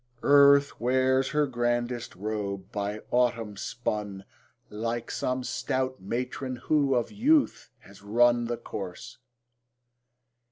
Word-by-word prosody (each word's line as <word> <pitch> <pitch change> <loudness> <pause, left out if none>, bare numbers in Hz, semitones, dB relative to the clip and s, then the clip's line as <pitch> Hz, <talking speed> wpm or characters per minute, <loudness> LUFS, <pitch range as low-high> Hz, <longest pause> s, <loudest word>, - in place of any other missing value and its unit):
Earth 140 0 +5
wears 130 +2 +2
her 150 -1 +2
grandest 120 -1 -2
robe, 100 -1 -4
by 105 -1 -3
autumn 115 -4 +1
spun, 105 -4 -4 0.5
Like 115 +2 -3
some 130 0 -2
stout 130 -1 -2
matron 125 +5 -3
who 140 +1 +1
of 120 - -1
youth 275 +8 +2
has 100 0 -16
run 120 +3 +3
The 120 0 -3
course 100 +5 -8
120 Hz, 110 wpm, -27 LUFS, 105-130 Hz, 0.5 s, Earth